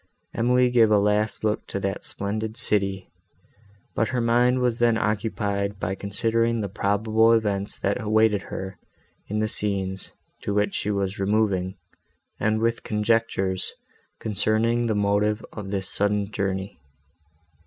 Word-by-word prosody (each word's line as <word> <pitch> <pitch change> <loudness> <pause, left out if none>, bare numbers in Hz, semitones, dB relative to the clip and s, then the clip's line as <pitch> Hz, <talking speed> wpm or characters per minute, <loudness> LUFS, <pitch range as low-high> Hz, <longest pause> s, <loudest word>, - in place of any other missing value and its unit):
Emily 125 +2 +2
gave 115 -3 +5
a 105 - +5
last 105 +2 +1
look 105 -1 -1
to 100 - -4
that 95 0 -3
splendid 110 +2 -3
city, 95 -2 +1 0.8
but 115 - +1
her 125 +1 -1
mind 120 +2 +3
was 125 -2 0
then 120 -1 +3
occupied 100 -2 -1
by 95 - -2
considering 115 +4 0
the 105 - -2
probable 110 +4 +2
events, 100 -3 0
that 100 - -1
awaited 110 -1 +2
her, 95 0 -6 0.5
in 105 - -3
the 110 - +1
scenes, 95 -3 0 0.3
to 100 - -3
which 105 0 +1
she 105 - -2
was 100 -1 -2
removing, 100 -2 0 0.6
and 110 0 +1
with 115 0 0
conjectures, 105 -3 0 0.4
concerning 110 +3 +1
the 110 - 0
motive 105 +1 +1
of 105 -2 -7
this 95 -1 -1
sudden 105 0 +1
journey. 95 -2 -3
105 Hz, 140 wpm, -24 LUFS, 100-115 Hz, 0.8 s, gave